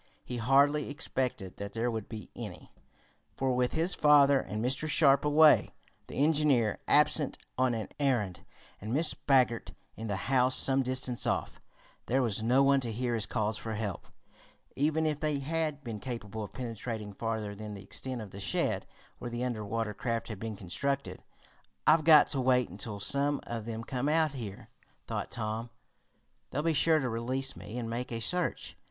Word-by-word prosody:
He 125 - -5
hardly 140 +5 +3
expected 130 - -3
that 100 0 -6
there 115 +2 -1
would 110 -2 -5
be 110 -4 -8
any, - - -8 0.7
for 130 -1 +1
with 125 0 +1
his 165 +4 +1
father 145 -2 +5
and 105 -2 -5
Mr. 135 +6 0
Sharp 140 -3 +5
away, 150 +1 +5 0.4
the - - -9
engineer 145 -6 +2
absent 150 -1 +3 0.2
on 130 -2 +1
an 110 -2 -4
errand, 120 -10 0 0.4
and 105 +3 -6
Mrs. 160 +2 +5
Baggert 125 -4 +2 0.2
in 110 - -6
the 100 - -1
house 130 +4 +2
some 135 0 +3
distance 130 -1 -1
off, - - -2 0.5
there 130 +2 +2
was 110 -3 +1
no 125 +5 +3
one 140 0 +4
to 120 -3 -4
hear 120 +2 -2
his 110 -3 0
calls 110 0 -1
for 110 -1 -4
help, 105 -4 -4 0.7
even 155 +3 +1
if 150 -2 0
they 150 -2 0
had 150 +1 -2
been 115 -4 -5
capable 110 -4 -6
of 105 - -8
penetrating 115 -4 -5
farther 110 -1 -3
than 105 0 -7
the 100 - -10
extent 125 +5 -2
of 100 - -11
the 100 - -9
shed, 100 - -1 0.3
where 120 - -5
the 120 +1 -3
under 120 -4 -2
water 110 +1 -2
craft 115 +1 -3
had 110 -4 -6
been 110 0 -5
constructed. 135 +9 -3 0.6
"I've 155 0 +5
got 155 -2 +8
to 135 - 0
wait 125 -1 +2
until 110 -7 -5
some 140 +6 +1
of 115 -2 -5
them 115 0 -5
come 130 +4 -2
out 155 -1 +3
here," 110 -7 -8 0.4
thought - - -4
Tom. 110 +1 -4 0.8
"They'll 150 - -2
be 165 0 +2
sure 160 +2 +4
to 135 -4 -1
release 130 +4 -2
me 115 - -8
and 120 -2 -3
make 120 +2 -4
a 115 - -3
search. 180 +9 -1
125 Hz, 180 wpm, -30 LUFS, 110-140 Hz, 0.8 s, got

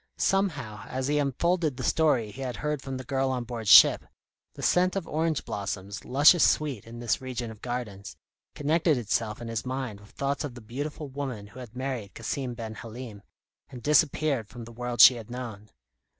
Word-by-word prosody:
Somehow, 145 - -1
as 130 0 -3
he 150 0 +2
unfolded 155 +1 0
the - - -5
story 130 -9 +2
he 135 - -9
had 125 -2 -3
heard 150 -2 -2
from 135 -1 -5
the 130 - -6
girl 135 +1 0
on 125 -2 -1
board 115 -2 -6
ship, - - +8 0.5
the - - -8
scent 180 +1 +3
of 190 -4 -3
orange 160 -1 -1
blossoms, 100 0 -5
luscious 145 +6 +6
sweet 140 -9 +1
in 115 +1 -9
this 120 +1 -1
region 125 -3 -4
of 110 - -13
gardens, 110 -5 -5 0.4
connected 155 +1 +2
itself 110 -1 -1
in - - -6
his 115 -2 -3
mind 130 -5 -4
with 105 0 -17
thoughts 140 +2 -2
of 140 -5 -6
the - - -8
beautiful 145 +7 -5
woman 130 -6 -5
who 110 +5 -13
had 120 -2 -10
married 130 -6 -4
Cassim 125 +2 -3
ben 115 -2 -6
Halim, 115 -2 -9 0.5
and 125 -4 -10
disappeared 150 -4 +2
from 120 +2 -10
the 120 - -11
world 120 0 0
she 125 - +10
had 115 -1 -10
known. 115 -4 -7
125 Hz, 195 wpm, -27 LUFS, 115-145 Hz, 0.5 s, she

